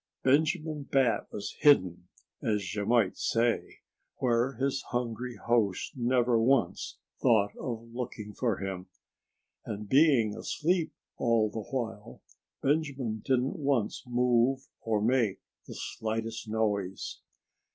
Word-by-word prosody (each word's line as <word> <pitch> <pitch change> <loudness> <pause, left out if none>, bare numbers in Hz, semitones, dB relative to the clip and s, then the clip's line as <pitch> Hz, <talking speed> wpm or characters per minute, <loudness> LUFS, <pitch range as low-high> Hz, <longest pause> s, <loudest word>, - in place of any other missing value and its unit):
Benjamin 150 +1 +1
Bat 130 -4 +2
was 100 - -5
hidden—as 95 - +1
you 105 -1 -2
might 115 -5 +3
say—where 120 +1 -1
his 135 +2 -1
hungry 120 0 -3
host 110 -6 0
never 120 -1 +2
once 120 -6 +1 0.2
thought 105 -5 +3
of 115 -1 -6
looking 110 -4 -5
for 115 -4 0
him. 95 -2 -5 0.8
And 105 0 -6
being 130 -5 +4
asleep 165 0 0 0.3
all 115 -2 +2
the 110 - -4
while, 110 -3 -5 0.4
Benjamin 135 -6 0
didn't 130 +1 0
once 135 -7 0
move 125 +2 +2
or 110 -2 0
make 115 -4 +2 0.3
the - - -8
slightest 115 +1 -4
noise. 105 -4 -1
120 Hz, 110 wpm, -29 LUFS, 110-130 Hz, 0.8 s, being